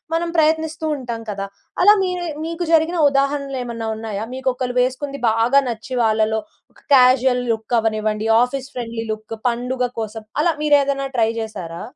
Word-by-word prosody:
మనం 335 +1 -1
ప్రయత్నిస్తూ 315 0 +1
ఉంటాం 235 -3 -5
కదా! 195 0 -4 0.4
అలా 415 +2 +8
మీరే 360 -2 -2 0.2
మీకు 335 +1 -3
జరిగిన 325 +2 +3
ఉదాహరణలు 275 0 0
ఏమన్నా 230 -2 -5
ఉన్నాయా? 215 -1 -4
మీకు 265 0 -6
ఒకళ్ళు 250 -1 -3
వేసుకుంది 275 +2 -2
బాగా 235 +5 +3
నచ్చి, 235 +3 -6
వాళ్ళలో 220 0 +2 0.5
క్యాజువల్ 250 0 +4
లుక్ 220 +2 -6
అవ్వనివ్వండి, 215 -1 -1 0.2
ఆఫీస్ 270 +1 -4
ఫ్రెండ్లీ 230 -2 -4
లుక్, 215 +1 -8
పండుగ 250 +2 -2 0.2
కోసం, 220 0 -5 0.2
అలా 340 +2 +3
మీరేదైనా 280 -2 +2
ట్రై 225 -2 +3
చేసారా? 175 -7 -6
250 Hz, 145 wpm, -20 LUFS, 225-280 Hz, 0.5 s, అలా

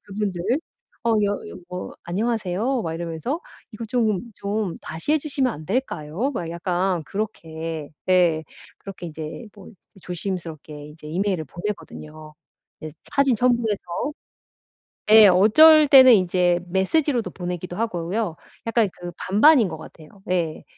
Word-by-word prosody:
그분들. 200 -3 -4 0.6
어 230 - +2
여 200 - +1 0.2
여 - - -9
뭐 180 0 -6
"안녕하세요." 220 +5 -1
막 165 -1 -3
이러면서 170 - -3 0.3
"이거 220 +2 -7
좀 225 -1 -1
좀 200 -3 -3
다시 160 - -3
해 310 - +4
주시면 275 -4 -1
안 155 -4 -10
될까요?" 215 - -2
막 175 -10 -4
약간 175 +1 -1
그렇게 165 -7 -5 0.2
예 170 -4 +3 0.3
그렇게 190 -3 -9
인제 160 +8 -8
뭐 200 -2 -13 0.3
조심스럽게 165 -5 -6
이제 150 0 -13
이메일을 180 0 -1
보내거든요, 155 -3 -8 0.5
예 155 - -5 0.2
사진 280 -3 +3
첨부해서. 235 -3 +1 1.3
예. 215 -1 +9
어쩔 295 - +7
때는 260 -3 +9
이제 180 -2 +2
메시지로도 235 - 0
보내기도 180 0 -5
하고요. 190 -3 -2 0.3
약간 230 -2 +2
그 175 0 -6
반반인 225 +5 +5
것 160 - -6
같아요. 155 0 -13 0.2
예. 165 -4 -1
190 Hz, 280 characters per minute, -23 LUFS, 165-230 Hz, 1.3 s, 예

